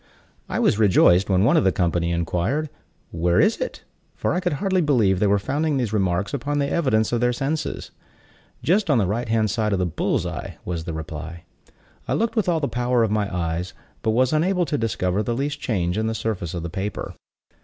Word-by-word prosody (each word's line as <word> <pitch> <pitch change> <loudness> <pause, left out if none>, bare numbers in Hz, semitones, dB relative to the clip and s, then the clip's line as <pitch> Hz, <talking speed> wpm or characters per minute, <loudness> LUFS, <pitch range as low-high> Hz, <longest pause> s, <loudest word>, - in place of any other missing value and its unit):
I - - -2
was 105 - +2
rejoiced 95 -2 +5
when 95 0 +3
one 115 - +4
of - - +3
the 95 - +4
company 85 -2 0
inquired, 90 - -1 0.4
"Where 85 +1 +1
is - - +3
it?" - - -5 0.3
for - - -1
I 180 - +1
could 180 -3 -1
hardly 190 +4 +1
believe 115 - +2
they 105 - +3
were 100 +1 +4
founding 145 +8 -1
these 120 -5 -1
remarks 95 -1 0
upon 145 +2 -2
the 140 -1 +1
evidence 130 -9 +1
of 120 -1 0
their 125 0 +3
senses. 140 +5 -3 0.7
"Just 195 +2 +2
on 140 - +4
the 105 - +2
right 110 +5 -2
hand 110 -2 +2
side 110 -1 0
of - - +1
the 90 - 0
bull's 85 - -1
eye," - - -6
was 85 -2 -4
the 85 - -4
reply. 80 +1 -7 0.6
I - - 0
looked 230 +1 0
with 215 -5 +1
all 165 -2 +2
the 140 - -1
power 125 -1 +1
of 110 - 0
my 105 -2 0
eyes, 85 0 -3 0.3
but - - 0
was 125 +5 +2
unable 175 +3 +2
to 155 - -2
discover 100 -3 0
the 115 +2 -2
least 145 +2 -2
change 95 -7 -1
in 110 - 0
the 110 - -2
surface 100 -7 -3
of 85 - -4
the 85 - -4
paper. 100 +4 -4
110 Hz, 220 wpm, -23 LUFS, 90-140 Hz, 0.7 s, rejoiced